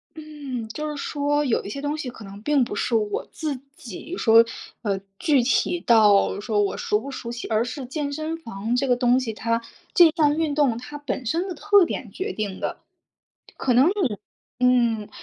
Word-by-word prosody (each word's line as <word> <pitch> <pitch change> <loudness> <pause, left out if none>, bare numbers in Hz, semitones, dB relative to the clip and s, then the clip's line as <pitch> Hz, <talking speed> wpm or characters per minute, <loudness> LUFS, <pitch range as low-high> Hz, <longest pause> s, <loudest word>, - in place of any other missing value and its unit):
嗯， 290 -7 -6
就 300 +7 -4
是 300 - -5
说 290 +1 0
有 245 - +1
一 - - -7
些 275 +7 -5
东 290 +1 -2
西 280 -5 -4
可 230 -3 -11
能 200 0 -10
并 290 +2 +2
不 235 - -4
是 230 - 0
我 210 -2 0
自 300 -5 -4 0.2
己 250 - -8
说 230 0 +6 0.4
呃， 200 -4 -1 0.2
具 285 -4 +3
体 345 +7 +1
到 210 -4 +4
说 210 0 0
我 200 - -1
熟 210 - 0
不 275 +4 -7
熟 235 -3 -6
悉， 240 - -6
而 220 0 +1
是 250 +3 -5
健 285 +2 -3
身 310 +3 -3
房 225 -5 -3
这 265 +2 +1
个 245 - +4
东 245 0 +3
西 235 -4 -3
它， 230 +2 -1 0.3
这 350 -6 +8
项 295 -3 +3
运 310 -2 0
动 275 -6 +2
它 250 +5 -8
本 285 -3 -4
身 335 - 0
的 370 - -4
特 405 +2 +4
点 - - -5
决 390 +2 -4
定 205 -3 -4
的。 - - -3 1.8
可 250 - +1
能， 240 -3 +3
嗯， - - -16
255 Hz, 215 characters per minute, -24 LUFS, 225-300 Hz, 1.8 s, 这